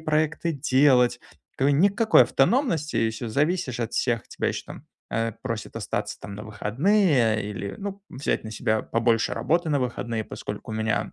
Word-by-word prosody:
проекты 155 Hz, +1 st, 0 dB
делать. 130 Hz, -3 st, +3 dB, 0.4 s
К 135 Hz, +2 st, +3 dB
никакой 200 Hz, +9 st, +5 dB
автономности, 175 Hz, -, +1 dB
и 115 Hz, -, +2 dB
все, 110 Hz, +1 st, -6 dB
зависишь 140 Hz, -1 st, 0 dB
от 115 Hz, 0 st, -3 dB
всех. 120 Hz, -3 st, 0 dB
Тебя -, -, -2 dB
еще -, -, -4 dB
там, -, -, -10 dB, 0.3 s
э, 115 Hz, 0 st, -1 dB
просят 115 Hz, -4 st, -4 dB
остаться -, -, -3 dB
там 100 Hz, -, -8 dB
на 105 Hz, -, -8 dB
выходные 120 Hz, -, +2 dB
или, 100 Hz, -1 st, -5 dB
ну, 200 Hz, 0 st, -6 dB
взять 130 Hz, -3 st, -2 dB
на 110 Hz, -, -6 dB
себя 110 Hz, 0 st, 0 dB
побольше 115 Hz, +1 st, +1 dB
работы 170 Hz, -1 st, 0 dB
на 140 Hz, -2 st, +2 dB
выходные, 120 Hz, -2 st, -2 dB
поскольку -, -, -7 dB
у -, -, -4 dB
меня 110 Hz, 0 st, -1 dB
130 Hz, 165 wpm, -25 LUFS, 115-155 Hz, 0.4 s, никакой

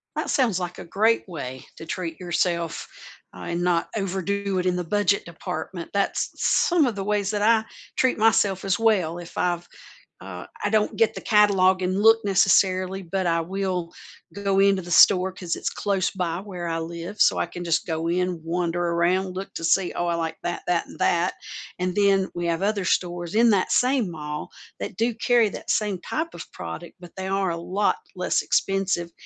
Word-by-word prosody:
That -, -, -2 dB
sounds 235 Hz, -, +2 dB
like 175 Hz, -1 st, -5 dB
a -, -, -8 dB
great 215 Hz, +7 st, +1 dB
way 130 Hz, -7 st, -7 dB
to -, -, -10 dB
treat 165 Hz, -1 st, -5 dB
yourself, 170 Hz, -2 st, -1 dB, 0.5 s
uh, -, -, -10 dB
and 170 Hz, +1 st, -2 dB
not 175 Hz, -2 st, +1 dB
overdo 195 Hz, 0 st, -2 dB
it 180 Hz, -, -2 dB
in 180 Hz, -1 st, +2 dB
the 180 Hz, -, -2 dB
budget 200 Hz, +2 st, +1 dB
department. 170 Hz, +1 st, -6 dB
That's 200 Hz, -1 st, 0 dB
some 340 Hz, -4 st, +3 dB
of 240 Hz, -4 st, -1 dB
the 195 Hz, -, -3 dB
ways 205 Hz, 0 st, 0 dB
that 210 Hz, -1 st, -1 dB
I 220 Hz, +1 st, +4 dB, 0.3 s
treat 260 Hz, -3 st, +2 dB
myself 205 Hz, -3 st, +3 dB
as 195 Hz, +1 st, +1 dB
well. 190 Hz, -7 st, +2 dB
If 175 Hz, -, -11 dB
I've 175 Hz, -1 st, 0 dB, 0.5 s
uh, 90 Hz, -1 st, -8 dB, 0.2 s
I 205 Hz, -, 0 dB
don't 215 Hz, -1 st, +1 dB
get 225 Hz, -, +3 dB
the -, -, -7 dB
catalog 190 Hz, -3 st, +4 dB
and 185 Hz, +2 st, 0 dB
look 225 Hz, +1 st, +7 dB
necessarily, 190 Hz, -1 st, +3 dB
but 185 Hz, +1 st, -2 dB
I 170 Hz, 0 st, +2 dB
will 180 Hz, -1 st, -3 dB, 0.4 s
go 200 Hz, -1 st, -1 dB
into 195 Hz, -1 st, +4 dB
the 175 Hz, -, -10 dB
store 185 Hz, +1 st, +6 dB
'cause 180 Hz, -2 st, -4 dB
it's -, -, -2 dB
close 195 Hz, -2 st, -1 dB
by 175 Hz, -3 st, -2 dB
where 185 Hz, -3 st, -6 dB
I 165 Hz, 0 st, -1 dB
live. 170 Hz, +5 st, -6 dB
So -, -, +5 dB
I -, -, +1 dB
can 175 Hz, -, -8 dB
just 165 Hz, -1 st, 0 dB
go 160 Hz, 0 st, -2 dB
in, 180 Hz, 0 st, -1 dB
wander 175 Hz, +1 st, -1 dB
around, 175 Hz, +2 st, +1 dB
look 190 Hz, +1 st, -6 dB
to 165 Hz, -, -6 dB
see, 180 Hz, +2 st, +2 dB
"Oh, 175 Hz, -, -2 dB
I 170 Hz, -, +1 dB
like 165 Hz, -1 st, -3 dB
that, 175 Hz, -, -3 dB
that, 175 Hz, -1 st, 0 dB
and -, -, -12 dB
that." 175 Hz, +1 st, +1 dB, 0.4 s
And 180 Hz, 0 st, -1 dB
then 195 Hz, -2 st, +3 dB
we 175 Hz, 0 st, -3 dB
have 170 Hz, +3 st, -1 dB
other 205 Hz, -1 st, 0 dB
stores 175 Hz, 0 st, -1 dB
in 230 Hz, +1 st, +5 dB
that 195 Hz, -3 st, +1 dB
same 250 Hz, -5 st, +2 dB
mall 150 Hz, -2 st, -6 dB, 0.3 s
that -, -, -6 dB
do 230 Hz, +1 st, +1 dB
carry 235 Hz, -1 st, +3 dB
that -, -, -9 dB
same 205 Hz, -4 st, 0 dB
type 320 Hz, -, -3 dB
of -, -, -9 dB
product, -, -, -8 dB
but 175 Hz, -1 st, -13 dB
they 190 Hz, 0 st, -4 dB
are 195 Hz, -1 st, 0 dB
a -, -, -2 dB
lot 185 Hz, +5 st, 0 dB, 0.2 s
less -, -, 0 dB
expensive, 195 Hz, -3 st, 0 dB
185 Hz, 200 wpm, -24 LUFS, 170-200 Hz, 0.5 s, look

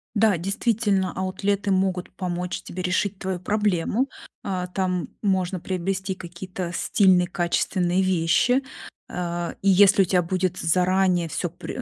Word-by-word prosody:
Да, 210 Hz, -3 st, +4 dB
действительно, 195 Hz, +1 st, 0 dB
аутлеты 195 Hz, +2 st, -1 dB
могут 185 Hz, -1 st, 0 dB
помочь 180 Hz, -1 st, -3 dB
тебе 185 Hz, +1 st, -6 dB
решить 185 Hz, +2 st, 0 dB
твою 190 Hz, -1 st, -3 dB
проблему. 210 Hz, +5 st, 0 dB, 0.3 s
А, 180 Hz, -2 st, -2 dB
там 180 Hz, -1 st, -1 dB
можно 190 Hz, -2 st, 0 dB
приобрести 190 Hz, +2 st, -2 dB
какие-то 180 Hz, 0 st, -6 dB
стильные, 185 Hz, -2 st, +3 dB
качественные 175 Hz, 0 st, 0 dB
вещи. 185 Hz, +8 st, +2 dB, 0.5 s
А, 175 Hz, -1 st, -3 dB
и 195 Hz, -, +2 dB
если 200 Hz, +1 st, +6 dB
у -, -, +4 dB
тебя 180 Hz, 0 st, +2 dB
будет 185 Hz, +1 st, -1 dB
заранее 180 Hz, 0 st, +2 dB
всё 175 Hz, -, -2 dB
пре 175 Hz, +9 st, -7 dB
185 Hz, 130 wpm, -24 LUFS, 180-195 Hz, 0.5 s, если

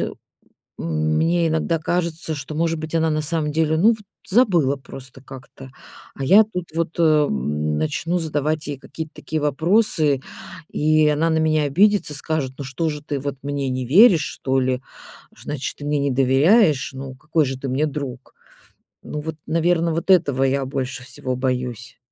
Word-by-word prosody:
м -, -, -2 dB, 1.1 s
мне 170 Hz, 0 st, +2 dB
иногда 160 Hz, +1 st, 0 dB
кажется, 165 Hz, -1 st, -2 dB
что 145 Hz, +1 st, -7 dB
может 165 Hz, +1 st, 0 dB
быть 155 Hz, +1 st, -6 dB
она 160 Hz, -1 st, +2 dB
на 155 Hz, 0 st, 0 dB
самом 155 Hz, -1 st, -1 dB
деле, 160 Hz, 0 st, +1 dB
ну, 205 Hz, -, +5 dB
вот 225 Hz, -, -1 dB, 0.3 s
забыла 175 Hz, -, +3 dB
просто 135 Hz, 0 st, -11 dB
как-то. 135 Hz, 0 st, -12 dB, 0.4 s
А 135 Hz, -, -5 dB
я 200 Hz, +9 st, +7 dB
тут 180 Hz, -5 st, -6 dB
вот, 165 Hz, 0 st, -2 dB
э, -, -, +3 dB
м, 75 Hz, -, +1 dB
начну 165 Hz, -, -1 dB
задавать 155 Hz, -1 st, -2 dB
ей 145 Hz, -2 st, -5 dB
какие-то 160 Hz, +2 st, -8 dB
такие 155 Hz, -1 st, -4 dB
вопросы, 155 Hz, -2 st, +2 dB, 0.5 s
и 155 Hz, 0 st, +3 dB
она 150 Hz, +2 st, +1 dB
на 160 Hz, -, +1 dB
меня 155 Hz, -1 st, +2 dB
обидится, 190 Hz, +2 st, +2 dB
скажет: 145 Hz, -3 st, -3 dB
"Ну 140 Hz, -, -5 dB
что 135 Hz, +5 st, -2 dB
же, 150 Hz, 0 st, -6 dB
ты 145 Hz, -2 st, -4 dB
вот 140 Hz, 0 st, -4 dB
мне 140 Hz, -1 st, -2 dB
не 130 Hz, 0 st, -2 dB
веришь, 180 Hz, -, +6 dB
что 135 Hz, 0 st, -2 dB
ли? 130 Hz, 0 st, 0 dB, 0.6 s
Значит, 145 Hz, -2 st, -5 dB
ты 145 Hz, -, -8 dB
мне 150 Hz, 0 st, +1 dB
не 140 Hz, 0 st, 0 dB
доверяешь! 140 Hz, -, +3 dB
Ну 135 Hz, 0 st, -7 dB
какой 150 Hz, +4 st, 0 dB
же 130 Hz, 0 st, -4 dB
ты 135 Hz, -, -5 dB
мне 135 Hz, +4 st, 0 dB
друг?" 135 Hz, -4 st, -6 dB, 0.7 s
Ну 150 Hz, -, -5 dB
вот, 160 Hz, 0 st, -5 dB
наверно, 165 Hz, +1 st, +1 dB
вот 170 Hz, +4 st, -3 dB
этого 145 Hz, -8 st, +3 dB
я 135 Hz, 0 st, 0 dB
больше 130 Hz, -1 st, -4 dB
всего 125 Hz, 0 st, -4 dB
боюсь. 125 Hz, -3 st, -3 dB
150 Hz, 175 wpm, -21 LUFS, 135-165 Hz, 1.1 s, я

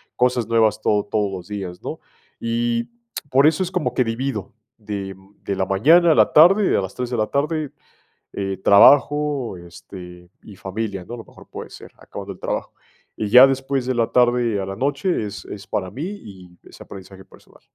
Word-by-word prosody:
cosas 125 Hz, -2 st, +1 dB
nuevas 110 Hz, -2 st, +2 dB
todo 105 Hz, -1 st, +1 dB
todos 105 Hz, -2 st, -1 dB
los 90 Hz, -2 st, -8 dB
días, 95 Hz, -4 st, -6 dB
¿no? -, -, -6 dB, 0.4 s
Y 115 Hz, 0 st, -1 dB, 0.4 s
por 135 Hz, +3 st, +5 dB
eso 160 Hz, +4 st, +2 dB
es 180 Hz, -, -5 dB
como 180 Hz, -, -2 dB
que 125 Hz, -, +3 dB
divido, 115 Hz, -3 st, -4 dB, 0.2 s
de 100 Hz, -3 st, -6 dB, 0.3 s
de 100 Hz, -, -3 dB
la 95 Hz, -, -1 dB
mañana 160 Hz, -, +4 dB
a -, -, -1 dB
la -, -, +4 dB
tarde, 190 Hz, +6 st, +6 dB
de -, -, +2 dB
las 95 Hz, +1 st, -6 dB
3:00 125 Hz, -1 st, -4 dB
de 120 Hz, -, -1 dB
la 110 Hz, -, 0 dB
tarde, 150 Hz, +1 st, -2 dB, 0.6 s
eh, 95 Hz, -1 st, -3 dB
trabajo, 145 Hz, +2 st, +4 dB
este, 90 Hz, 0 st, -12 dB
y 105 Hz, -, -13 dB
familia, 100 Hz, -2 st, -5 dB
¿no? 120 Hz, -, -9 dB
A -, -, -11 dB
lo 115 Hz, -, -9 dB
mejor -, -, -17 dB
puede -, -, -9 dB
ser, -, -, -13 dB
acabando -, -, -9 dB
el -, -, -19 dB
trabajo. -, -, -4 dB, 0.4 s
Y 105 Hz, -, -2 dB
ya 125 Hz, +4 st, +9 dB
después 135 Hz, -1 st, -2 dB
de 130 Hz, -, -1 dB
la 115 Hz, -1 st, 0 dB
tarde 120 Hz, -3 st, +2 dB
a -, -, -4 dB
la 95 Hz, -, -6 dB
noche 145 Hz, -, -1 dB
es 105 Hz, 0 st, -8 dB
es 100 Hz, 0 st, -9 dB
para 95 Hz, -2 st, -3 dB
mí 135 Hz, +8 st, -6 dB
y 95 Hz, -, -11 dB
ese -, -, -16 dB
aprendizaje 95 Hz, -1 st, -12 dB
personal. -, -, -21 dB
115 Hz, 195 wpm, -21 LUFS, 95-135 Hz, 0.6 s, ya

